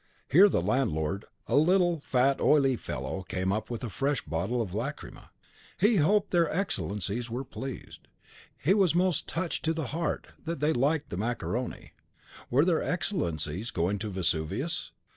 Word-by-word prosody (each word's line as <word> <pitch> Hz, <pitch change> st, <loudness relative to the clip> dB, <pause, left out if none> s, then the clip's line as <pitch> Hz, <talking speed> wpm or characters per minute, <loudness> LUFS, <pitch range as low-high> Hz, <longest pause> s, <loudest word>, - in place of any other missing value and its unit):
Here 195 Hz, +8 st, +8 dB
the -, -, +1 dB
landlord, 95 Hz, -, 0 dB, 0.2 s
a -, -, 0 dB
little, 175 Hz, +2 st, +4 dB
fat, 135 Hz, 0 st, +1 dB
oily 135 Hz, -3 st, +4 dB
fellow, 75 Hz, -, -4 dB
came 95 Hz, 0 st, -2 dB
up 110 Hz, -, -3 dB
with 120 Hz, 0 st, -5 dB
a 120 Hz, -, -3 dB
fresh 135 Hz, +7 st, 0 dB
bottle 85 Hz, +10 st, -1 dB
of 105 Hz, -6 st, -2 dB
lacrima. 125 Hz, +8 st, -5 dB, 0.5 s
He 210 Hz, +3 st, +4 dB
hoped 200 Hz, +6 st, +3 dB
their 170 Hz, -3 st, +3 dB
Excellencies 115 Hz, -, -2 dB
were 125 Hz, +4 st, -3 dB
pleased. 135 Hz, 0 st, -8 dB, 0.5 s
He 175 Hz, -, +3 dB
was 190 Hz, -5 st, +3 dB
most 180 Hz, -3 st, +1 dB
touched 170 Hz, 0 st, -2 dB
touched -, -, -4 dB
to 160 Hz, -, +2 dB
the 160 Hz, -4 st, -2 dB
heart, 165 Hz, -1 st, -1 dB, 0.2 s
that 165 Hz, -2 st, -3 dB
they 150 Hz, +3 st, +2 dB
liked 140 Hz, +5 st, +1 dB
the 90 Hz, -, -3 dB
macaroni. 120 Hz, +3 st, -3 dB, 0.6 s
Were 140 Hz, +6 st, +4 dB
their 175 Hz, -3 st, +2 dB
Excellencies 95 Hz, -, -2 dB
going 90 Hz, +4 st, 0 dB
to 110 Hz, +1 st, -4 dB
Vesuvius? 85 Hz, -5 st, -2 dB
130 Hz, 160 wpm, -29 LUFS, 100-165 Hz, 0.6 s, Here